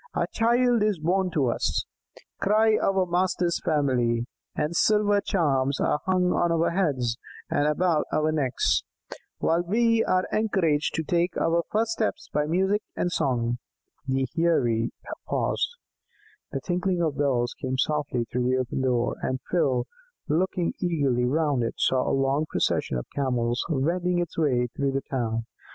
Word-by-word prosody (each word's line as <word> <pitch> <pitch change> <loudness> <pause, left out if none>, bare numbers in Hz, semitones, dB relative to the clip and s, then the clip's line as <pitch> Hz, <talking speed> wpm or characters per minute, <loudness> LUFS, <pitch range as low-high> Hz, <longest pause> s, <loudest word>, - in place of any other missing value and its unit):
'A - - +1
child 240 0 +3
is 210 -2 +2
born 180 +4 +1
to 150 -6 +1
us,' 120 - 0 0.6
cry 215 +2 +4
our 190 -1 +2
master's 175 -1 0
family; 125 -6 +1 0.3
and 150 +3 -1
silver 205 +1 +3
charms 140 -8 +1
are 150 - +1
hung 180 -1 +2
on 175 -1 +1
our 165 0 +2
heads 135 -10 0 0.3
and 145 - +2
about 160 0 +1
our 155 0 +1
necks, 140 -5 +1 0.6
while 165 +1 +1
we 230 +5 +2
are 185 0 +2
encouraged 180 -9 +1
to 160 - -1
take 175 +3 0
our 170 +1 +2
first 225 +1 +1
steps 315 +9 -2
by 150 0 +1
music 190 +5 +1
and 175 - -1
song." 120 -6 0 0.5
The 135 0 0
Heirie 120 -9 +2 0.4
paused. - - 0 0.8
The 135 - -3
tinkling 180 +1 0
of 150 -4 -1
bells 125 -4 +1
came 130 0 -2
softly 145 -3 0
through 125 +1 -1
the 130 - +2
open 130 +1 -2
door, 125 -2 0
and 130 0 -2
Phil, 130 -8 +1 0.4
looking 175 +2 0
eagerly 140 -9 +1
round 145 0 +1
it, 115 - -2
saw 130 -1 +1
a 135 - +1
long 135 +3 +1
procession 65 - 0
of - - -4
Camels 125 -3 0
wending 175 +5 0
its 175 -2 -2
way 130 -6 +2
through 140 -1 0
the 135 - -1
town. 115 -3 -1
155 Hz, 155 wpm, -26 LUFS, 130-180 Hz, 0.8 s, cry